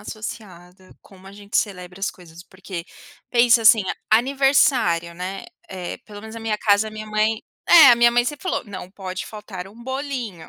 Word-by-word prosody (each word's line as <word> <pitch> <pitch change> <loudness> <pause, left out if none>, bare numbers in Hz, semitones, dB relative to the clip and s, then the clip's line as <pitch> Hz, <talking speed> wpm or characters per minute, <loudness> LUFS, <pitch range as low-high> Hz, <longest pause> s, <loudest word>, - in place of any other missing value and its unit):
associada 190 -4 -10
a - - -17
como 190 -1 -18
a 195 - -11
gente 205 +1 -5
celebra 180 -2 -3
as 195 - -1
coisas, 170 -1 -15
porque 185 -2 -8 0.5
pensa 235 -1 +4
assim: 220 -1 +6 0.3
aniversário, 245 - +2
né, 185 +2 -6 0.2
eh, 180 -2 -6
pelo 205 -1 -12
menos 220 +1 -10
na 230 - -7
minha 220 -1 -2
casa, 210 +1 +2
a - - -10
minha 215 0 -8
mãe 215 +1 0 0.3
é, 335 -4 +9
a 240 - +6
minha 235 0 +5
mãe 240 0 +2
sempre 295 +3 -5
falou: 370 - -2
"Não 185 -4 -9
pode 185 -2 -7
faltar 205 -4 -9
um 230 +4 -15
bolinho". 260 - -5
210 Hz, 190 wpm, -22 LUFS, 185-235 Hz, 0.5 s, é